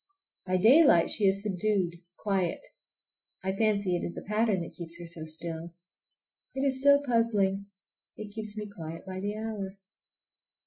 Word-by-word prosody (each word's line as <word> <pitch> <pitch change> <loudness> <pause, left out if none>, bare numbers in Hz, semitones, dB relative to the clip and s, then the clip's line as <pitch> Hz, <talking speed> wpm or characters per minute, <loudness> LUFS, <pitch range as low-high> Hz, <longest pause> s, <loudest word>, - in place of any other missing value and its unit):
By 185 0 +2
daylight 225 - +6
she 210 - +1
is 195 +1 +2
subdued, 190 -3 0 0.2
quiet. 190 -4 0 0.8
I 190 - 0
fancy 200 -2 +1
it 175 - -2
is 175 - -4
the - - -7
pattern 210 -2 +1
that - - -9
keeps 170 -1 -8
her 175 - -8
so 165 -1 -5
still. 165 +1 -6 0.8
It 270 - -1
is 265 -1 +2
so 285 +1 +6
puzzling. 205 -5 +1 0.5
It 215 -1 -7
keeps 215 -1 -5
me 210 - -3
quiet 165 -5 -8
by 185 -1 -5
the 205 +2 -3
hour. 205 -3 -5
195 Hz, 160 wpm, -29 LUFS, 175-215 Hz, 0.8 s, daylight